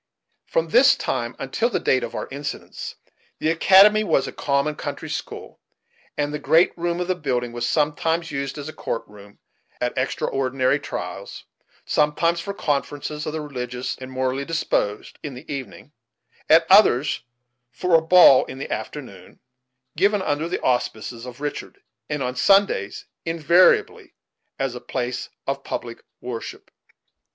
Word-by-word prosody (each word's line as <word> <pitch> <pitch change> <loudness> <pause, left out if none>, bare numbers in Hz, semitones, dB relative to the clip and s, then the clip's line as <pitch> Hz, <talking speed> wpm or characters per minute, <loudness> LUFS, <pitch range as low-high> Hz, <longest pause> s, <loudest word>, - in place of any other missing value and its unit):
From - - 0
this - - +6
time - - -3
until 235 +2 -1
the - - -1
date 130 - +2
of 115 - -5
our - - -4
incidents, 145 +2 -6 0.4
the 155 - +1
academy 195 +5 +6
was 140 - +1
a - - -5
common 140 +2 0
country - - -6
school, - - -6 0.6
and 145 0 -1
the 150 - -3
great 165 +4 +3
room 175 0 -2
of 180 - -2
the 185 - +2
building 125 -8 -2
was 120 0 -2
sometimes 160 +2 0
used 140 0 -4
as 145 0 -6
a 155 - -7
court 115 - -4
room, 100 -1 -15 0.4
on 125 0 0
extraordinary 130 +1 0
trials; - - -6 0.4
sometimes 165 +3 +1
for 200 - -4
conferences 150 -3 -3
of 155 - -3
the 160 - -3
religious 125 -3 -4
and 130 0 -9
the 130 - -11
morally 130 +1 -1
disposed, 140 -9 -2
in 140 -4 -6
the 130 +5 -11
evening; 140 +1 -8 0.6
at 165 +1 +6
others 150 - +5 0.5
for 175 +8 -2
a 165 - +7
ball 160 -5 +7
in - - -9
the 135 - -6
afternoon, 100 -11 -8 0.6
given 200 +4 +2
under 150 +1 -1
the - - -2
auspices 120 -1 -1
of 125 +2 -10
Richard; 145 0 -5 0.3
and 150 -2 -2
on 125 0 -3
Sundays, 195 - +2 0.2
invariably, 165 +2 +3 0.4
as 135 -2 -2
a 125 - -8
place 125 0 -4 0.2
of 140 0 -3
public 115 -1 -5 0.2
worship. 120 -2 -7
145 Hz, 155 wpm, -23 LUFS, 130-165 Hz, 0.6 s, a